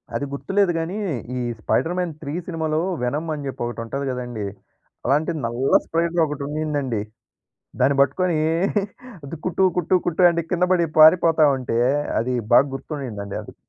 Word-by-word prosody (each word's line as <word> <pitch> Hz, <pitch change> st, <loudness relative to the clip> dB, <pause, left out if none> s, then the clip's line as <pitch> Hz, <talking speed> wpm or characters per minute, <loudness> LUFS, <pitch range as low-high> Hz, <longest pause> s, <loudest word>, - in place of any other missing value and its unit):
అది 145 Hz, -, -1 dB
గుర్తులేదు 195 Hz, +6 st, +1 dB
గాని, 170 Hz, +5 st, -3 dB, 0.4 s
ఈ -, -, -1 dB, 0.2 s
స్పైడర్‌మ్యాన్ 175 Hz, +7 st, 0 dB
3 145 Hz, +5 st, -3 dB
సినిమాలో, 160 Hz, -3 st, -1 dB, 0.2 s
వెనమ్ 150 Hz, +6 st, -2 dB
అని 145 Hz, -2 st, -5 dB
జెప్పి, 130 Hz, -, -4 dB
ఒకటుంటది 120 Hz, +4 st, -4 dB
కదండీ! 120 Hz, -4 st, -4 dB, 0.6 s
అలాంటి 150 Hz, +6 st, +2 dB
నల్ల 120 Hz, +4 st, -1 dB
స్పైడర్ 170 Hz, 0 st, +1 dB
ఒకటి 150 Hz, -2 st, -5 dB
ఉండిందండి. 145 Hz, -7 st, -2 dB, 0.8 s
దాన్ని 140 Hz, 0 st, +3 dB
బట్టుకొనీ, 160 Hz, +5 st, +2 dB, 0.9 s
అది 140 Hz, +4 st, -6 dB
కుట్టూ, 185 Hz, +2 st, +1 dB
కుట్టూ, 180 Hz, +2 st, +1 dB
కుట్టు 175 Hz, +1 st, +1 dB
అంటే, 170 Hz, 0 st, -1 dB
కిందపడి 180 Hz, -1 st, +2 dB
పారిపోతా 160 Hz, 0 st, +6 dB
ఉంటే, 120 Hz, -2 st, -2 dB, 0.4 s
అది 125 Hz, +2 st, -1 dB, 0.2 s
బాగ -, -, +7 dB
గుర్తుండిందండి 125 Hz, -9 st, -6 dB
అది. -, -, -13 dB
150 Hz, 135 wpm, -22 LUFS, 130-170 Hz, 0.9 s, బాగ